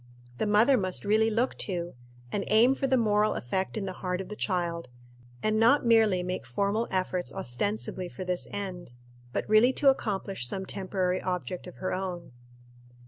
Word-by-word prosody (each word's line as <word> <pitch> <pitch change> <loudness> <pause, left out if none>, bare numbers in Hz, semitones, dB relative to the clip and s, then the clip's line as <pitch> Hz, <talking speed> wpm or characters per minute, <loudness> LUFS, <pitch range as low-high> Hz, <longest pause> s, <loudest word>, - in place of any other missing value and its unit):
The - - 0
mother 220 +6 +5
must 185 -1 -2
really 220 +2 +3
look 230 +4 0
to, 175 -3 -3 0.4
and 200 - -1
aim 230 +5 +5
for 270 0 -1
the 260 - +3
actual 240 - +2
moral 210 0 +3
effect 190 - -2
in 205 - -2
the 190 - -4
heart 180 -1 -3
of 190 - -6
the 210 - -6
child, 175 -5 -2 0.6
and 215 0 +2
not 240 +5 +4
merely 220 -6 +4
make 180 -3 -3
formal 200 - -1
efforts 185 -1 -1
ostensibly 120 - -2
for 185 - -7
this 180 -1 -2
end, 185 -9 -6 0.4
but - - -2
really 215 +5 +5
to 275 0 +5
accomplish 195 - -3
some 190 +9 -2
temporary 185 -1 -1
object 180 0 -4
of 180 - -10
her 185 - -3
own. 185 -2 -4
190 Hz, 180 wpm, -28 LUFS, 180-215 Hz, 0.6 s, mother